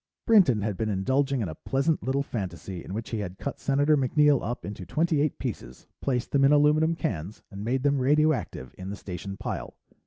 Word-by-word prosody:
Brinton 180 - +5
had 105 -3 -2
been 110 -1 -1
indulging 130 +7 +1
in 105 - -1
a 80 - -5
pleasant 140 - 0
little 135 +2 0
fantasy 95 -6 -5
in 95 - -6
which 115 +1 -5
he 115 - -2
had 95 -2 -5
cut 140 - -5
Senator 145 +2 +3
MacNeill 145 +1 +3
up 120 +3 -4
into 100 -2 -6
twenty 155 - +1
eight 150 - 0
pieces, 110 - -6 0.2
placed 125 -3 -1
them 140 -1 +3
in 135 - +6
aluminum 150 +2 +4
cans, 100 - -4
and 100 0 -7
made 130 +4 -1
them 140 -1 +2
radioactive 145 - +1
in 95 +1 -6
the 100 - -4
Station 95 0 -7
pile. 110 - -5
130 Hz, 205 wpm, -27 LUFS, 100-145 Hz, 0.2 s, in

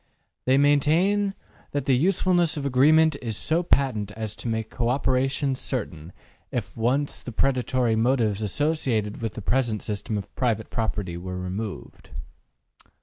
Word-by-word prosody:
They 130 +1 +4
maintain 165 +8 +3 0.4
that 140 -2 -1
the 135 - +4
usefulness 175 +2 +2
of 140 - -3
agreement 155 +4 +5
is 115 -4 -3
so 160 +2 +1
patent 130 - +1
as 110 -1 -5
to - - -6
make 110 -1 -2
co 120 -1 -1
operation 135 +1 +1
certain 95 - -5 0.4
if - - -4
once 130 +6 0
the 125 - -7
predatory 125 -1 +1
motives 110 -3 +1
associated 115 -4 -1
with 115 -2 -3
the 110 - -6
present 120 -2 0
system 105 +1 -3
of 100 - -7
private 115 -3 -1
property 105 -6 -2
were 90 +1 -5
removed. 95 +3 -6
125 Hz, 145 wpm, -25 LUFS, 110-145 Hz, 0.4 s, agreement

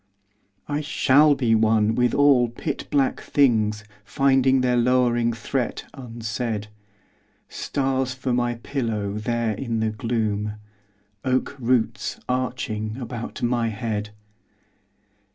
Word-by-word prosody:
I 145 0 -1
shall 150 -1 +4
be 120 -4 +1
one 110 -1 +3
with 125 +1 +1
all 140 -4 +5
pit 120 - -5
black 140 -2 +1
things 110 -6 +2 0.2
Finding 135 +2 +3
their 125 -1 +2
lowering 120 -1 +2
threat 115 +2 -3
unsaid: 115 -3 -4 0.8
Stars 130 -2 -1
for 130 -1 -2
my 120 -1 0
pillow 115 -5 -3
there 115 +1 -1
in 115 +1 -3
the 110 0 0
gloom,— 105 -2 -1 0.7
Oak 130 +2 0
roots 120 -2 0
arching 125 -4 -2
about 120 -2 -6
my 120 -1 +1
head! 110 -1 -3
120 Hz, 110 wpm, -24 LUFS, 110-130 Hz, 0.8 s, all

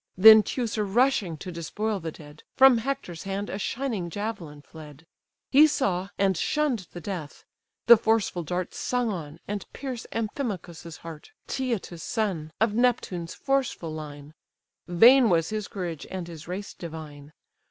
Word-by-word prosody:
Then 220 +3 +10
Teucer 225 -1 -2
rushing 205 - +1
to 180 +4 -7
despoil 200 +6 -3
the 165 -2 -5
dead, 150 -1 -14
From 265 -3 +7
Hector's 230 -9 -4
hand 195 +1 -4
a 195 - -4
shining 225 -6 -2
javelin 170 -7 -5
fled: 150 -1 -13 0.5
He 295 +3 +8
saw, 195 -10 -1
and 195 -1 +2
shunn'd 250 - 0
the 175 - -8
death; 175 -5 -7 0.4
the 235 -1 +9
forceful 220 -5 +1
dart 180 +2 -3
Sung 245 -3 -1
on, 160 -4 -6
and 205 -1 -5
pierced 255 -4 -6
Amphimachus's 195 - -4
heart, 160 -2 -9 0.2
Cteatus' 230 -10 -3
son, 185 -9 -2
of 220 0 +2
Neptune's 215 -8 0
forceful 270 - -1
line; 150 -1 -8 0.5
Vain 235 +8 +7
was 165 -2 +2
his 215 -2 -3
courage, 175 -6 -5
and 185 -2 -5
his 165 -2 -10
race 190 +3 -5
divine! 155 -3 -9
195 Hz, 145 wpm, -26 LUFS, 165-225 Hz, 0.5 s, Then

